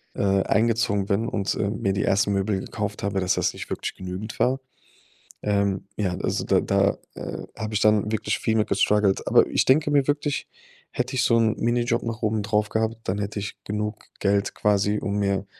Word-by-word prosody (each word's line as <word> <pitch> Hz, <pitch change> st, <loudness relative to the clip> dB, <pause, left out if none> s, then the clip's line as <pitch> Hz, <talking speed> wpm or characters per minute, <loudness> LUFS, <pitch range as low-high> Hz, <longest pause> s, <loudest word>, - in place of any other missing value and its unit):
äh, 100 Hz, -1 st, +2 dB
eingezogen 110 Hz, -2 st, +1 dB
bin 105 Hz, +4 st, +1 dB
und, 100 Hz, -3 st, -1 dB
äh, 100 Hz, -, 0 dB
mir 100 Hz, -1 st, -1 dB
die 100 Hz, -, 0 dB
ersten 100 Hz, +1 st, +2 dB
Möbel 100 Hz, 0 st, 0 dB
gekauft 105 Hz, 0 st, -4 dB
habe, 100 Hz, -1 st, 0 dB
dass 90 Hz, -, +1 dB
das -, -, 0 dB
nicht -, -, -8 dB
wirklich -, -, -3 dB
genügend 95 Hz, +4 st, -6 dB
war. 130 Hz, +2 st, +2 dB, 0.8 s
Ähm, 100 Hz, -2 st, 0 dB
ja, 100 Hz, -4 st, 0 dB
also, -, -, -1 dB
da -, -, +3 dB
da, -, -, +2 dB, 0.2 s
äh, -, -, -6 dB
habe 110 Hz, 0 st, -4 dB
ich -, -, +3 dB
dann 105 Hz, 0 st, +3 dB
wirklich 105 Hz, -1 st, -1 dB
viel 110 Hz, -1 st, +1 dB
mehr 110 Hz, -, +3 dB
gestruggelt. 105 Hz, -2 st, +2 dB
Aber, -, -, +5 dB
ich -, -, +2 dB
denke 145 Hz, +3 st, +4 dB
mir 140 Hz, -2 st, +3 dB
wirklich, 145 Hz, 0 st, -1 dB, 0.4 s
hätte 125 Hz, +1 st, -2 dB
ich -, -, +2 dB
so 115 Hz, -, +4 dB
‘n 110 Hz, -2 st, +3 dB
Minijob 120 Hz, 0 st, +1 dB
noch 115 Hz, 0 st, -4 dB
oben 110 Hz, -1 st, +1 dB
drauf 105 Hz, 0 st, 0 dB
gehabt, 110 Hz, +1 st, 0 dB
dann 95 Hz, +2 st, -1 dB
hätte 105 Hz, +1 st, -3 dB
ich 105 Hz, -, -6 dB
genug 105 Hz, +1 st, -3 dB, 0.2 s
Geld 100 Hz, 0 st, +1 dB
quasi, 105 Hz, 0 st, +2 dB
um 100 Hz, 0 st, -2 dB
mir 100 Hz, -1 st, 0 dB
105 Hz, 200 wpm, -24 LUFS, 100-110 Hz, 0.8 s, Aber